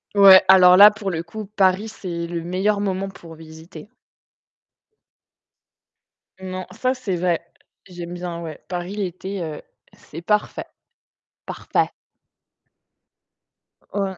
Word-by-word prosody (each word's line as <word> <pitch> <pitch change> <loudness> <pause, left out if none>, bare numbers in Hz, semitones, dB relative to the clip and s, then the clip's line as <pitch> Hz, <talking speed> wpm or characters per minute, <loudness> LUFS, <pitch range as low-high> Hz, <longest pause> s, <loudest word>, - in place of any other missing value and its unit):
Ouais, 195 -2 +8
alors 180 -1 +7
là, 205 +2 +9
pour 210 -2 -5
le 165 -1 -4
coup, 215 +5 -8
Paris, 195 +2 +2
c'est 170 -6 -6
le 170 0 -4
meilleur 195 +4 -1
moment 195 -1 -2
pour 170 -3 -13
visiter. 160 +2 -13 2.5
Non, 185 0 -6
ça, 255 0 -1
c'est 210 -8 -4
vrai. 175 -1 -1 0.4
J'aime 175 -1 -8
bien 175 -1 -6
ouais. 160 -3 -8
Paris 180 +2 -5
l'été 190 0 -5
heu, 155 -2 -7 0.3
c'est 165 +3 -12
parfait. 210 +2 -1 0.8
Parfait. - - -1 2.1
O - - 0
ouais. 190 -2 -4
185 Hz, 120 wpm, -21 LUFS, 170-200 Hz, 2.5 s, là